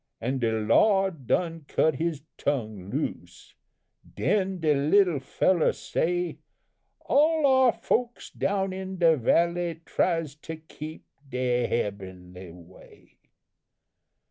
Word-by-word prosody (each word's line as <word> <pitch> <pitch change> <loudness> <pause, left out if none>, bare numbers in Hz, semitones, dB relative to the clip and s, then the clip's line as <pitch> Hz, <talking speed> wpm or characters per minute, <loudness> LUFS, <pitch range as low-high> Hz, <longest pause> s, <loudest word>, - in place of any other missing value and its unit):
An' 130 +3 -2
de 115 -2 +1
Lawd 160 - +2
done 165 0 -1
cut 160 - +2
his 160 -3 -2
tongue 110 -9 -3
loose, 90 - -5 0.6
den 190 -2 0
de 155 -2 +2
little 155 +3 +3
fellow 170 +5 +2
say 175 +1 -2 0.6
'All 310 +1 +3
our 260 -2 +5
folks 240 +1 -2
down 195 -1 -1
in 190 0 -6
the 165 -2 +5
valley 170 +5 +1
tries 165 -5 0
to 160 +1 -7
keep 155 0 -10 0.2
de 125 -1 0
hebbenly 95 -4 -5
way.' 90 +1 -18
160 Hz, 110 wpm, -26 LUFS, 120-185 Hz, 0.6 s, our